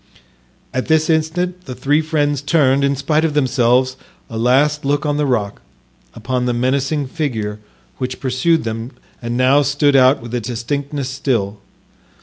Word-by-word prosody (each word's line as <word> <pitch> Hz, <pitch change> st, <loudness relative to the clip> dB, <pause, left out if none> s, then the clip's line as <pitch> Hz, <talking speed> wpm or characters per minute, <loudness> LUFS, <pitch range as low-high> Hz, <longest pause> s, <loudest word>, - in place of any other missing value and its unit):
At 130 Hz, -, -2 dB
this 160 Hz, 0 st, +3 dB
instant 175 Hz, +3 st, -1 dB
the 130 Hz, -, -7 dB
three 145 Hz, +4 st, +1 dB
friends 145 Hz, -3 st, 0 dB
turned, 140 Hz, -3 st, +2 dB
in 140 Hz, 0 st, +2 dB
spite 150 Hz, +3 st, 0 dB
of 155 Hz, -2 st, 0 dB
themselves, 130 Hz, -2 st, +2 dB, 0.3 s
a 115 Hz, -, -4 dB
last 140 Hz, +5 st, +2 dB
look 145 Hz, +2 st, 0 dB
on 145 Hz, -1 st, 0 dB
the 150 Hz, -1 st, +1 dB
rock, 105 Hz, -6 st, -1 dB, 0.5 s
upon 125 Hz, -1 st, -2 dB
the 120 Hz, -, 0 dB
menacing 135 Hz, +4 st, 0 dB
figure 115 Hz, -8 st, -3 dB, 0.4 s
which 125 Hz, 0 st, -4 dB
pursued 135 Hz, +6 st, +1 dB
them 115 Hz, +3 st, -5 dB, 0.3 s
and 120 Hz, 0 st, -3 dB
now 130 Hz, +3 st, +4 dB
stood 145 Hz, 0 st, +2 dB
out 130 Hz, +1 st, +5 dB
with 120 Hz, 0 st, -10 dB
a 120 Hz, -, -1 dB
distinctness 135 Hz, +4 st, -3 dB
still. 120 Hz, -7 st, -2 dB
135 Hz, 155 wpm, -18 LUFS, 125-150 Hz, 0.5 s, out